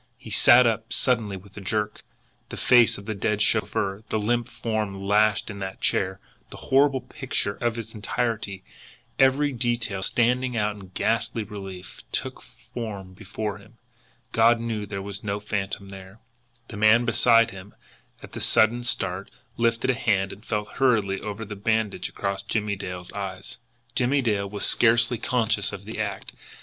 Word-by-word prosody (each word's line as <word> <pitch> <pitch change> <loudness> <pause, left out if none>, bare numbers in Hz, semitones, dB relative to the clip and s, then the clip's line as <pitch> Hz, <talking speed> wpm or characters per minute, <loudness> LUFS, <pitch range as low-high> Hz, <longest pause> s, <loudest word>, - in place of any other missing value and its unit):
He - - -11
sat 125 +1 +7
up 115 -1 0
suddenly 115 -6 +1
with 100 +1 -16
a - - -6
jerk. 105 +2 -2 0.5
The - - -7
face 120 -2 +5
of 100 - -11
the 110 - -2
dead 105 +1 -1
chauffeur, 100 -1 0
the - - 0
limp 120 +3 0
form 110 -4 -3
lashed 105 +2 +2
in 100 - -8
that 95 0 -5
chair, 95 0 0 0.3
the - - -10
horrible 135 0 +3
picture 125 -5 -3
in 120 -1 0
its 115 0 -8
entirety, 110 -3 -3 0.6
every 135 +2 +4
detail 120 -5 -1
standing 125 +4 +1
out 105 -1 0
in 100 -2 -11
ghastly 115 0 0
relief, 95 -3 -9
took - - -3
form 100 -6 -8
before 105 +1 -5
him. 115 +3 -19 0.5
God 115 +1 +4
knew 110 -3 -3
there 95 0 -5
was 100 0 -6
no 100 0 -2
phantom 100 -1 -3
there! 95 +1 -11 0.5
The 100 - -7
man 110 +3 +5
beside 115 0 +4
him, 95 +1 -11 0.5
at - - -10
the - - -6
sudden 120 +3 +4
start, 95 -5 -1 0.3
lifted 115 +2 +1
a - - 0
hand 100 -5 0
and 105 - -14
felt 105 -2 -4
hurriedly 105 -7 +2
over 105 +1 -5
the 105 0 -7
bandage 110 +1 -1
across 100 -1 -3
Jimmie 105 0 -1
Dale's 90 -2 -7
eyes. 95 -2 -6 0.3
Jimmie 130 +3 +2
Dale 100 -4 0
was 100 0 -2
scarcely 115 0 +4
conscious 110 -5 +1
of 100 - -8
the 110 +1 -6
act. 100 -3 -4
105 Hz, 165 wpm, -25 LUFS, 100-115 Hz, 0.6 s, sat